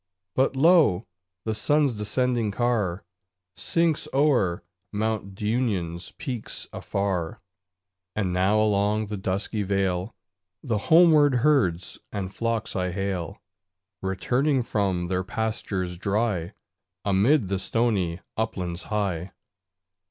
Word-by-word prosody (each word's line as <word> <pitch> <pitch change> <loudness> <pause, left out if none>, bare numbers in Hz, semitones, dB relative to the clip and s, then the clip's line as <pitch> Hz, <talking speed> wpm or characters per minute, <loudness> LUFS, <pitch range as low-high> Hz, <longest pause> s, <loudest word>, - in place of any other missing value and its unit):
But 135 +1 +2
lo! 140 - +5 0.4
the 110 - 0
sun's 145 +4 +2
descending 115 +2 0
car 105 -5 0 0.5
Sinks 165 -2 0
o'er 125 - +2 0.3
Mount 105 -2 -2
Dunion's 105 -6 -1
peaks 125 -4 -5
afar; 95 -5 -2 0.8
And 95 -4 0
now 95 +4 +3
along 105 0 +2
the 105 0 -4
dusky 95 +3 -2
vale 95 0 -1 0.5
The 115 -6 0
homeward 155 -5 +6
herds 95 - +2
and 95 -1 -4
flocks 115 -1 -2
I 90 -1 0
hail, 95 0 -3 0.6
Returning 125 +9 +1
from 95 -6 0
their 90 +1 -1
pastures 100 -4 -3
dry 100 -4 0 0.5
Amid 105 +5 +3
the 95 0 -1
stony 95 -5 0
uplands 90 -5 -2
high. 95 -4 -2
105 Hz, 105 wpm, -26 LUFS, 95-120 Hz, 0.8 s, homeward